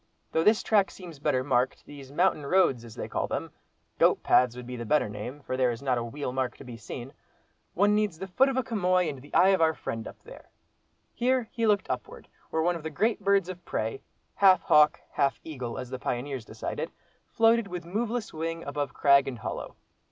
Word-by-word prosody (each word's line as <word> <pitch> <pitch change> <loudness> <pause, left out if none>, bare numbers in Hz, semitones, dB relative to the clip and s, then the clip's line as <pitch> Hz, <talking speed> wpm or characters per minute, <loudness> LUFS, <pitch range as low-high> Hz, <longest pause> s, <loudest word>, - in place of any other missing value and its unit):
Though 160 - +2
this 215 +3 +4
track 205 -3 +3
seems 170 -6 -11
better 130 -2 +1
marked, 130 -2 0
these 140 -2 -11
mountain 170 -1 +2
roads, 140 -9 +3
as 115 -2 -11
they - - -5
call - - -2
them—goat - - -2
paths 125 -1 +4
would 125 0 -8
be 125 +1 -6
the 120 - -5
better 150 +4 +2
name—for 125 +7 -6
there 130 -1 +2
is 120 +2 -5
not 130 -3 +1
a - - -3
wheel 125 +2 -5
mark 130 -2 -2
to - - -11
be 125 -3 -9
seen—one 135 - -4
needs 210 -5 +1
the 190 - -5
foot 255 +9 +3
of 265 - -2
a 260 - +2
chamois 185 -6 +1
and 140 -4 -5
the 145 - -15
eye 190 - +6
of 190 -3 +3
our 160 -1 +3
friend 115 -1 -5
up - - -10
there." - - -13 0.6
Here 250 -1 +1
he 230 -1 0
looked 205 -2 +2
upward, 125 -1 -6 0.2
where 160 - 0
one 175 +1 +2
of 165 - -6
the 160 - -4
great 215 +10 0
birds 200 -2 +3
of 180 -1 -8
prey, 110 -1 -3 0.3
half 190 -2 +5
hawk, 150 0 +5
half 140 -1 +1
eagle, 130 -7 -6
as 125 -1 -6
the 130 - -4
pioneers 125 -1 -3
decided, - - -5 0.4
floated 225 -1 +3
with 180 -2 -6
moveless 225 +5 -3
wing 165 +1 -4
above 145 -1 -4
crag 140 -1 +5
and 130 -3 -4
hollow. 110 - -6
150 Hz, 210 wpm, -28 LUFS, 130-190 Hz, 0.6 s, eye